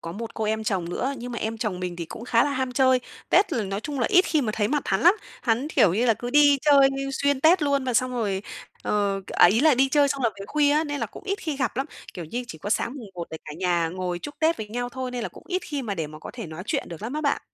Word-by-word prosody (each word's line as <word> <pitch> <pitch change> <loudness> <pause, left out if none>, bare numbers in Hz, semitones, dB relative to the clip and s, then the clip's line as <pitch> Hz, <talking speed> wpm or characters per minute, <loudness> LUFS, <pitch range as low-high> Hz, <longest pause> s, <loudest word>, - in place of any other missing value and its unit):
có 165 - -6
một 225 +4 -7
cô 220 - -2
em 220 +1 -1
chồng 185 -5 -1
nữa, 270 +9 -2
nhưng 245 0 -7
mà 235 - -3
em 225 +1 -3
chồng 210 -6 -2
mình 180 -1 -4
thì 170 - -4
cũng 220 +8 -9
khá 235 -1 +3
là 290 - -1
ham 260 -2 -2
chơi, 260 0 +4 0.3
Tết 395 - +4
là 230 -4 0
nói 195 +1 -3
chung 285 +3 -4
là 230 - +2
ít 365 - +6
khi 315 -5 +1
mà 215 -4 -1
thấy 210 -2 0
mặt 295 +2 0
hắn 195 0 +1
lắm. 350 - +6 0.3
Hắn, 240 +5 +1
kiểu 180 - +4
như 235 +5 +1
là, 230 - +4
cứ 240 +3 -6
đi 290 0 +6
chơi 280 -2 +6 0.2
xuyên 280 0 +1
Tết 325 +3 +5
luôn 280 -2 +1
và 250 -2 -1
xong 255 +2 +2
rồi, 205 -6 -1 0.4
ờ, 200 -1 0
à, - - +5
ý 210 +7 +3
là 310 -1 +5
đi 265 +2 +3
chơi 285 +1 +4
xong 275 -1 -2
rồi 230 - +3
về 195 - -7
khuya 295 +2 +2
á 305 +2 +2
nên 290 -2 -4
là - - -1
cũng - - -12
ít 395 0 -2
khi 310 -4 -4
gặp 255 -6 -1
lắm. 270 +2 -1 0.3
Kiểu 175 - -6
như, 240 +10 -4
chỉ 160 - -8
có 205 - -6
sáng 235 +4 0
mùng 225 -5 -9
Một 170 -1 -5
để 160 - -5
cả 150 - -7
nhà 175 -2 +1
ngồi 180 0 -3
chúc 290 - -8
Tết 320 +2 +2
với 215 -1 -6
nhau 245 +2 -3
thôi 260 0 -5
nên 250 -1 -4
là - - -3
cũng - - -15
ít 370 -1 -2
khi 285 -3 -4
mà 210 -4 -3
để 165 -4 -3
mà 155 +1 -11
có - - -9
thể 235 -5 -7
nói 160 +2 -7
chuyện - - -2
được 170 +1 -9
lắm 230 +4 -4
á 305 - -2
bạn. 285 -2 +1
245 Hz, 315 wpm, -25 LUFS, 200-280 Hz, 0.4 s, ít